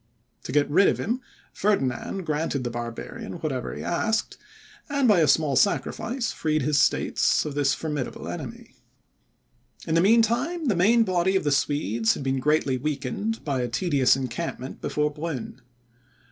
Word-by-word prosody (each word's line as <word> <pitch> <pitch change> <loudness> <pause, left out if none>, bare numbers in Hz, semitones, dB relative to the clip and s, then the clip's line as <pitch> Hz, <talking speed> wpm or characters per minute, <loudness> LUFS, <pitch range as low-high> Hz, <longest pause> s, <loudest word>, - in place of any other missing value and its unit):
To - - -4
get 145 +1 +3
rid 160 +7 +4
of - - +2
him, 240 +5 -2 0.3
Ferdinand 190 -1 -1
granted 150 -3 -1
the 120 - -3
barbarian 120 0 -6
whatever 145 -7 -4
he - - -6
asked, 220 +5 -1 0.5
and, 280 -2 +2
by 205 -5 +5
a 155 - +4
small 145 0 +3
sacrifice, 230 - 0
freed 155 -2 -1
his 150 +1 +2
states - - +2
of 150 - -4
this 140 -1 +1
formidable 150 -5 -4
enemy. - - -7 1.1
In 160 - -2
the 165 - +4
mean 225 +5 +5
time, 275 +8 -1
the 205 - +2
main 225 +7 +4
body 185 -1 +1
of 190 - +2
the 145 - +1
Swedes 120 -6 +1
had - - -6
been 135 0 0
greatly 145 -2 +1
weakened 150 - -3
by 135 -4 0
a 125 - -1
tedious 130 0 +2
encampment 130 0 -5
before 150 0 0
Brunn. 145 -5 -6
150 Hz, 160 wpm, -25 LUFS, 135-195 Hz, 1.1 s, by